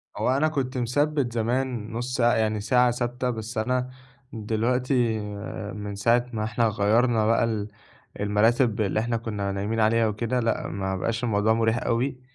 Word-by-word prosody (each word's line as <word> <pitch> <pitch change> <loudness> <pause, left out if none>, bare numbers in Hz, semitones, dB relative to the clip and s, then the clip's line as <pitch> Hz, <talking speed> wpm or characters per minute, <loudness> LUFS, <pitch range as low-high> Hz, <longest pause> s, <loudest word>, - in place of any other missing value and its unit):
هو - - 0
أنا 155 +3 +3
كنت 135 -4 -2
مثبّت 135 +1 0
زمان 120 -1 -1
نُص 120 +2 -3
ساعة، 120 -1 +4
يعني 110 -1 0
ساعة 125 +3 +3
ثابتة، 125 +1 -2
بس 115 0 -5
أنا 125 +3 0 0.4
دلوقتي 115 +2 0 0.5
من 105 -1 -6
ساعة 120 +4 +2
ما 110 -1 -2
إحنا 115 +2 +1
غيّرنا 110 +2 +2
بقى 115 +1 +3
ال 110 -3 -1 0.5
المراتب 110 +3 +2
اللي 105 +1 0
إحنا 115 +1 -1
كنا 105 -3 -3
نايمين 100 +3 -2
عليها 110 +1 +3
وكده، 115 +4 -1
لأ، 115 -1 -1
ما 95 -1 -3
بقاش 115 +5 -2
الموضوع 110 -1 +2
مُرِيح 115 0 +1
أوي 125 +3 -1
115 Hz, 160 wpm, -25 LUFS, 110-125 Hz, 0.5 s, ساعة